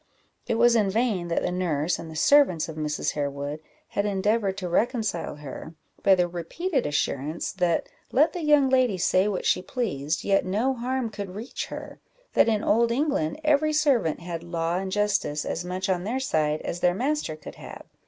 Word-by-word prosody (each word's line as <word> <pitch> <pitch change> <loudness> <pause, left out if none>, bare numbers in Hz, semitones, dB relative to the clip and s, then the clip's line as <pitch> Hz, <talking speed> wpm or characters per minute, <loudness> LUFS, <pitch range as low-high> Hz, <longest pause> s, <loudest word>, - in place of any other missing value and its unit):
It - - +1
was 235 +1 +5
in 210 -4 +3
vain 210 -4 0
that 170 - 0
the - - 0
nurse 175 -3 0
and 165 - -7
the 160 - -9
servants 185 - +4
of 160 - -7
Mrs. 150 -1 -1
Harewood 145 +1 -3 0.3
had 200 - -1
endeavoured 205 0 0
to 185 -2 -3
reconcile 215 - 0
her, 150 +2 -9 0.3
by 195 -1 +6
the 180 -1 +2
repeated 255 - -2
assurance, 145 +1 -2
that 180 -4 0 0.2
let 300 +5 +4
the 355 - -4
young 295 -2 +5
lady 255 -6 +3
say 185 +2 +2
what 200 -3 -2
she 180 - +2
pleased, 165 - -2
yet 195 -1 +2
no 215 +8 0
harm 250 -1 -2
could 200 -3 -6
reach 225 +5 -5
her: - - -8 0.3
that - - +4
in 215 -1 +1
old 235 +2 +3
England, 255 - 0
every 305 0 +3
servant 270 - +2
had 170 -1 -5
law 170 0 -1
and 190 0 -4
justice 200 -7 0
as 170 - -3
much 185 +2 -3
on 180 -2 0
their 235 +7 -1
side 155 - 0
as 175 - -4
their 175 0 +2
master 270 - -1
could 155 - -11
have. - - -9
190 Hz, 190 wpm, -26 LUFS, 165-240 Hz, 0.3 s, by